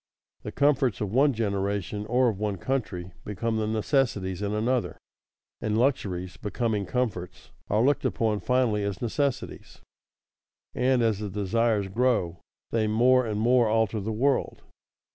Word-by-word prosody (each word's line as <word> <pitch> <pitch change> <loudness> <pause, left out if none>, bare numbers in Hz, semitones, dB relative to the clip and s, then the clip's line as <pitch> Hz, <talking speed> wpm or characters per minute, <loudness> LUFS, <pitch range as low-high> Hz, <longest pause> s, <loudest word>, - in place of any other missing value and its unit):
The - - -6
comforts 135 -6 +2
of 105 -3 -3
one 140 +3 +4
generation, 100 -2 -2
or 125 +2 +3
of 100 -4 -4
one 105 -2 -1
country, 90 -6 -3
become 110 +3 -2
the 110 -1 -1
necessities 110 - 0
in 100 0 -1
another; 115 +4 -1 0.6
and 110 0 0
luxuries 95 -8 -1
becoming 105 -2 -2
comforts, 105 -7 -3 0.2
are 105 +2 +2
looked 145 +2 +2
upon 110 -2 0
finally 115 0 +1
as 100 -3 -3
necessities. 135 +3 -3 0.9
And 125 -1 +2
as 110 -3 +1
the 105 -1 -4
desires 105 +1 0
grow, 100 -5 0 0.3
they 110 -2 +1
more 125 +3 +4
and 105 -1 -2
more 120 +1 +4
alter 110 0 +1
the 105 +3 -3
world. 130 +5 0
110 Hz, 145 wpm, -26 LUFS, 100-125 Hz, 0.9 s, one